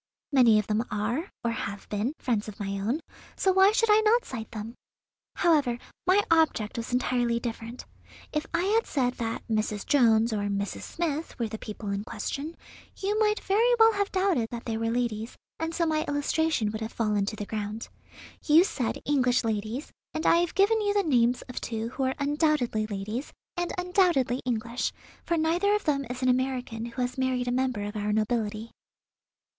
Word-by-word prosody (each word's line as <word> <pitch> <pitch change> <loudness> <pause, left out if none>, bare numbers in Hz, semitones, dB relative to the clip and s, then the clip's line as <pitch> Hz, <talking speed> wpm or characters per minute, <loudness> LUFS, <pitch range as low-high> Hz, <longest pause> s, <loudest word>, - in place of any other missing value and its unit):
"Many 245 -6 +6
of 210 - +1
them 215 +2 0
are, 235 - -2
or 235 - +1
have 205 -3 -5
been, 215 +7 -1
friends 225 -5 -1
of 210 - -9
my 200 -1 -3
own; 235 +11 -1 0.3
so 380 - +2
why 385 +2 +6
should 455 -1 +3
I 420 - +7
not 450 +3 +3
cite 225 -4 -6
them? 225 0 -6 0.6
However, 295 -9 +3 0.3
my 390 +3 +5
object 315 -11 +2
was 230 +1 -4
entirely 245 -1 +1
different. 230 0 -6 0.5
If 300 0 -1
I 345 - +1
had 435 +4 +2
said 250 -3 0
that 225 -1 -3
Mrs. 215 -2 -1
Jones 230 -4 +4
or 205 -1 -1
Mrs. 200 0 -2
Smith 325 -2 -3
were 235 - -1
the 220 0 -6
people 210 -1 -6
in 200 +1 -2
question, 280 +9 -5 0.4
you 410 +2 0
might 425 -1 +2
very 455 +5 +3
well 450 0 +6
have 405 -1 -1
doubted 370 - +1
that 235 -1 -7
they 225 - -2
were 225 0 -1
ladies, 230 -1 -2 0.2
and 325 0 -2
so 335 0 0
my 310 -1 +1
illustration 290 -5 +1
would 220 +1 -5
have 220 - -4
fallen 210 -3 0
to 215 - -2
the 205 - -5
ground. 215 +1 -4 0.6
You 315 +3 +6
said 260 - -2
English 255 -4 +2
ladies, 220 +5 -3 0.2
and 315 - -2
I - - +6
have 345 -1 0
given 430 +3 +4
you 410 -1 0
the 405 - +3
names 245 -6 +2
of 250 - -7
two 225 0 -3
who 265 - -6
are 260 - 0
undoubtedly 285 -7 +1
ladies, 210 +6 -4 0.2
and 350 -1 -2
undoubtedly 355 - +2
English, 235 0 -1 0.3
for 340 - 0
neither 345 +6 +2
of 420 - -1
them 280 -2 0
is 255 +1 -5
an - - +2
American 250 -3 0
who 240 +2 -3
has 250 +1 -3
married 255 -1 0
a - - +1
member 255 -4 0
of 205 +1 -5
our 210 0 -1
nobility." 215 0 -1
250 Hz, 190 wpm, -27 LUFS, 220-325 Hz, 0.6 s, I